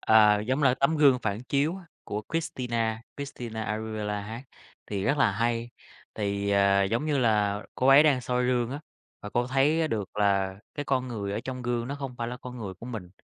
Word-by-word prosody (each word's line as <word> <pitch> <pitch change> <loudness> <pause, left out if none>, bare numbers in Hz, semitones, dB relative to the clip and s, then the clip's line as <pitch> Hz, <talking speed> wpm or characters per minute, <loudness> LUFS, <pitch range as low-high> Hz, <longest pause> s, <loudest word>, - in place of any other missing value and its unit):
À, 105 -1 +5
giống 130 +7 -1
là 130 -2 +5
tấm 140 +4 +1
gương 140 -4 +5
phản 110 -1 -3
chiếu 145 +6 0
á, 190 - -11 0.2
của 105 +1 -4
Christina 115 -8 -1
Christina 120 -6 -5
Aguilera 105 -1 -3
hát, 110 +4 -7 0.4
thì 100 -2 -3
rất 145 +5 +1
là 115 - +4
hay. 115 +2 -1 0.4
Thì, 100 -1 -1
ờ, 100 0 +4
giống 115 +9 -1
như 150 -2 +1
là 105 -4 +2
cô 130 - 0
ấy 135 +2 +9
đang 145 -5 +3
soi 125 0 0
gương 120 -1 +1
á, 140 - -5 0.4
và 105 - -7
cô 120 +2 0
thấy 150 +5 +2
được 105 -6 -2
là 100 -2 +2 0.2
cái 145 - -3
con 130 -2 0
người 100 -4 -4
ở 105 - -2
trong 130 -1 -5
gương 120 0 -1
nó 140 - -3
không 135 -3 -6
phải 115 0 -2
là 125 - -5
con 125 0 -9
người 100 -4 -5
của 115 - -11
mình. 105 -8 -6
120 Hz, 215 wpm, -27 LUFS, 105-130 Hz, 0.4 s, ấy